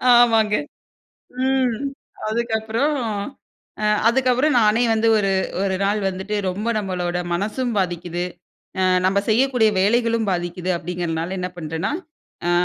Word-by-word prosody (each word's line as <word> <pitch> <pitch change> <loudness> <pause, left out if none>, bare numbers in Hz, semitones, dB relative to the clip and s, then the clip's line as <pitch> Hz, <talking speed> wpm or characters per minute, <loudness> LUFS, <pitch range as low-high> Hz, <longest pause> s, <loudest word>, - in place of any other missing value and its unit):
ஆமாங்க. 225 -3 +5 0.9
ம். 260 -3 +2 0.5
அதுக்கப்புறம் 225 +5 0 0.9
அ - - 0 0.2
அதுக்கப்புறம், 255 +4 +2
நானே 220 +1 +3
வந்து 225 +1 +2
ஒரு 195 -1 +1 0.3
ஒரு 190 -1 0
நாள் 205 +2 +1
வந்துட்டு 190 +3 -3
ரொம்ப 205 +5 -3
நம்மளோட 180 -3 -2 0.2
மனசும் 215 +7 -1
பாதிக்குது. 175 -1 -2 0.6
அ - - +2 0.2
நம்ம 195 +1 +2
செய்யக்கூடிய 240 -1 +3
வேலைகளும் 230 +1 +2
பாதிக்குது 175 0 -2
அப்டிங்கிறனால 170 +1 -3
என்ன 180 0 -2
பண்றேன்னா. 160 -1 -3 0.6
அ - - +3
210 Hz, 115 wpm, -21 LUFS, 180-235 Hz, 0.9 s, ஆமாங்க